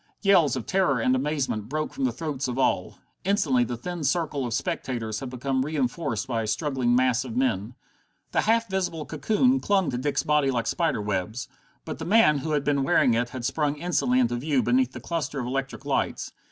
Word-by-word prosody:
Yells 175 - +4
of 130 - -4
terror 185 -10 +2
and 125 +3 +2
amazement 130 -6 -1
broke 155 +2 -2
from 270 0 -1
the 255 - +1
throats 150 -4 -3
of 125 0 -4
all. 135 - 0 0.3
Instantly 155 -11 +2
the 120 0 -4
thin 175 +6 -5
circle 150 -4 0
of 115 - -4
spectators 115 -4 -3
had 135 - -6
become 130 +1 -1
reinforced 135 -5 -2
by 115 -3 -1
a 110 - -3
struggling 125 0 0
mass 125 -1 +2
of 125 -2 -6
men. 120 -3 0 0.6
The - - +2
half 230 +1 +2
visible 185 -5 -2
cocoon 225 - +2
clung 195 -7 +1
to 125 - -2
Dick's 140 0 0
body 150 -2 +2
like 120 -3 0
spider 165 - 0
webs. 105 +4 -2 0.4
But - - -6
the - - -5
man 190 -8 +5
who 155 +3 -3
had 145 -2 +1
been 140 -1 +1
wearing 125 -2 +3
it 120 +1 0
had 125 -2 -6
sprung 150 0 0
instantly 145 -6 +1
into 120 -1 +1
view 135 0 +1
beneath 125 +1 +2
the 120 - -7
cluster 155 -1 -3
of 125 - -3
electric 135 +2 -4
lights. - - -1
135 Hz, 205 wpm, -26 LUFS, 125-155 Hz, 0.6 s, man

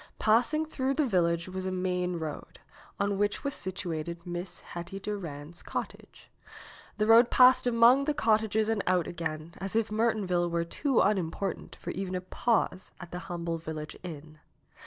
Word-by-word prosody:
Passing 240 +8 +3
through 270 -3 -1
the 300 0 +2
village 170 -6 +1
was 185 0 -4
a - - -1
main 180 -1 -1
road, 155 -2 -6 0.4
on 200 0 0
which 205 +4 0
was 280 -1 -2
situated 170 -2 -4
Miss 175 0 -5
Hetty 175 +3 -7
Durand's 170 -6 -6
cottage. - - -7 0.7
The 215 - +2
road 230 +2 +7
passed 255 0 +6
among 245 +3 +5
the 300 0 0
cottages 220 -2 +2
and 220 -2 +1
out 180 -2 +3
again, 165 -1 -5
as 195 +3 -4
if 225 -1 +1
Mertonville 210 -6 +1
were 170 0 0
too 270 - +1
unimportant 195 -1 -1
for - - -6
even 185 0 -4
a 180 - -2
pause 185 -1 0
at 175 -2 -10
the 180 - -4
humble 170 -1 -3
village 155 -1 -6
inn. 155 -3 -9
185 Hz, 160 wpm, -29 LUFS, 170-220 Hz, 0.7 s, road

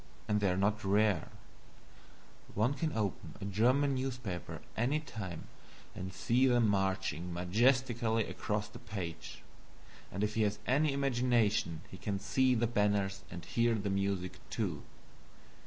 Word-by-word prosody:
And 105 0 +2
they 100 -2 +2
are 90 - +1
not 105 +3 +1
rare; 100 -3 +2 1.3
one 110 +6 +2
can 155 +3 -1
open 105 -4 -2
a - - -5
German 125 +8 +3
newspaper 125 - -3
at - - -9
any 125 +7 +1
time 105 - -6 0.5
and 95 +1 -5
see 120 +8 +2
them 120 -3 +4
marching 95 -4 0
majestically 115 +5 +2
across 105 -3 -2
the 105 - -11
page 85 -7 -6 0.7
and 100 - -2
if 105 0 0
he 110 - +1
has 105 -1 +1
any 145 +3 +3
imagination 120 - +1
he 95 - -8
can 100 +1 -2
see 130 +5 +2
the 120 0 +2
banners 105 -3 +1
and 85 -2 -8
hear 115 +4 +2
the 100 -2 -2
music, 95 -2 -1
too. - - -2
105 Hz, 145 wpm, -33 LUFS, 95-120 Hz, 1.3 s, them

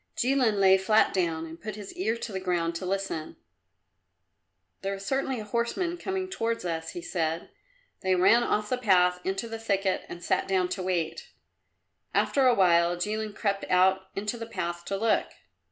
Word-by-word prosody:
Jilin 250 -4 +2
lay 190 -1 +6
flat 215 +3 +3
down 165 -3 0
and 165 +1 -10
put 215 -1 -5
his 205 -2 -8
ear 220 +5 -1
to 230 - -6
the 190 - -3
ground 175 -2 0
to 180 +2 -5
listen. 195 -5 -3 1.5
"There 195 0 -2
is 195 0 -9
certainly 265 0 -1
a - - -5
horseman 235 - -1
coming 380 0 -2
towards 230 - -2
us," 165 -1 -3
he 175 - -6
said. 165 -1 -2 0.5
They 190 -1 +1
ran 190 +6 +5
off 210 -3 0
the 255 - 0
path 180 -5 +4
into 195 +4 -2
the 225 0 -6
thicket 195 -3 0
and 175 - -8
sat - - 0
down 185 -2 +1
to 185 +1 -3
wait. 170 -3 -2 0.9
After 270 -2 +3
a 245 - +5
while 175 -2 +4
Jilin 210 +3 -3
crept 200 -2 -1
out 190 +1 +3
into 210 +4 -3
the 230 - -5
path 175 -5 -4
to 195 - -2
look. 225 +2 +2
195 Hz, 180 wpm, -28 LUFS, 180-225 Hz, 1.5 s, lay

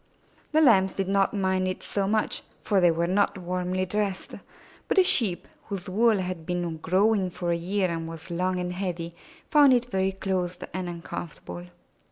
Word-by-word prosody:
The 310 +1 +4
Lambs 195 -9 +5
did 195 -1 -2
not 195 0 +2
mind 190 -2 0
it 185 - -4
so 200 -1 -1
much, 215 +1 0 0.2
for 200 -2 +2
they 175 - +6
were 165 +1 +1
not 195 +3 +1
warmly 180 +1 -2
dressed, 200 0 -2 0.5
but - - 0
the 380 - +8
Sheep, 220 - +1 0.2
whose 195 -4 -5
wool 220 +3 +3
had 180 -3 -3
been 175 -1 -2
growing 190 +4 +2
for 175 0 -3
a - - +2
year 185 +3 0
and 165 -1 -3
was 165 +2 -9
long 180 +2 0
and 180 0 -3
heavy, 175 -3 -4 0.4
found 290 -3 +7
it 245 0 +1
very 190 0 +1
close 185 -2 -2 0.2
and 185 -1 -3
uncomfortable. 150 - -7
185 Hz, 180 wpm, -26 LUFS, 175-200 Hz, 0.5 s, the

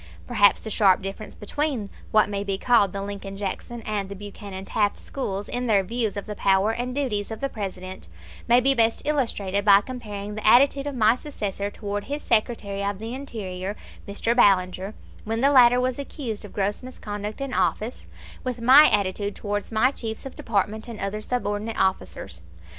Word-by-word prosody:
Perhaps 205 -5 +4
the 220 - -6
sharp 195 -3 +4
difference 195 +2 -6
between 245 -2 -3 0.2
what 215 -1 +4
may 200 -1 -3
be 195 -1 -2
called 215 -3 +3
the 195 +1 -4
Lincoln 200 -1 -6
Jackson 215 +4 -5
and 205 -3 -2
the 200 - -6
Buchanan 200 -1 -8
Taft 205 0 0
schools, 205 -7 -4
in 245 0 -2
their 200 -3 +4
views 220 0 -2
of 200 - -4
the 210 - -5
power 195 +2 +3
and 245 +2 -3
duties 220 -8 -1
of 220 -1 -6
the 275 - -1
President, 190 -4 -6 0.4
may 240 +1 +6
be 270 +2 +3
best 230 -3 +2
illustrated 210 -9 0
by 200 -1 +7
comparing 210 -4 -6
the 215 0 -3
attitude 275 +4 +5
of 285 - -4
my 220 -1 +4
successor 205 -8 -4
toward 205 -1 -4
his 290 +2 -4
Secretary 215 -3 0
of 200 0 -1
the 225 +3 -6
Interior, 205 -8 -5 0.3
Mr. 215 +4 0
Ballinger, 190 -2 +3 0.3
when 225 +1 -2
the 280 +2 +5
latter 245 -2 +7
was 255 +1 -1
accused 250 -6 -5
of 205 - -10
gross 205 0 -1
misconduct 210 -4 -6
in 275 -2 -4
office, 190 +6 -1 0.4
with 250 -2 -3
my 260 +6 +8
attitude 200 0 0
towards 205 0 -3
my 225 +4 +3
chiefs 225 -4 -6
of 270 - -7
department 215 0 -1
and 230 -3 -8
other 195 +2 -3
subordinate 215 -1 -2
officers. 190 - -1
210 Hz, 180 wpm, -25 LUFS, 200-245 Hz, 0.4 s, my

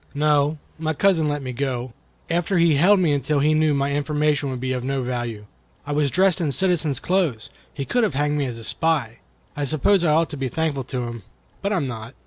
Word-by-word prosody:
"No; 150 +1 +2 0.2
my 160 -1 -1
cousin 165 -3 +3
let 145 -1 -2
me 130 -1 -5
go, 125 -2 -3 0.3
after 175 +3 0
he 170 0 +4
had 140 - +2
held 200 +3 +6
me 165 -5 +2
until 145 +1 0
he 150 +2 +3
knew 155 -1 +2
my 140 0 0
information 145 0 0
would 130 -1 -4
be 130 +1 -2
of 125 -1 -3
no 135 0 -1
value. 120 -4 -4 0.4
I 145 - -5
was 145 -1 +1
dressed 185 +2 +2
in 155 -4 0
citizen's 165 -7 +1
clothes. 170 - -1 0.2
He 140 - -5
could 245 - +1
have 205 -11 0
had 145 +1 +1
me 145 -1 0
hanged - - -3
as - - -9
a 115 - -9
spy. 140 -5 0 0.4
I 145 - -3
suppose 155 +7 +2
I 160 - +3
ought 165 +2 +2
to 150 - -5
be 135 -1 -2
thankful 150 -3 -2
to 130 -1 -4
him, 120 -1 -6 0.4
but 200 - -1
I - - +1
am 155 - -1
not." 115 0 -7
145 Hz, 240 wpm, -22 LUFS, 130-160 Hz, 0.4 s, held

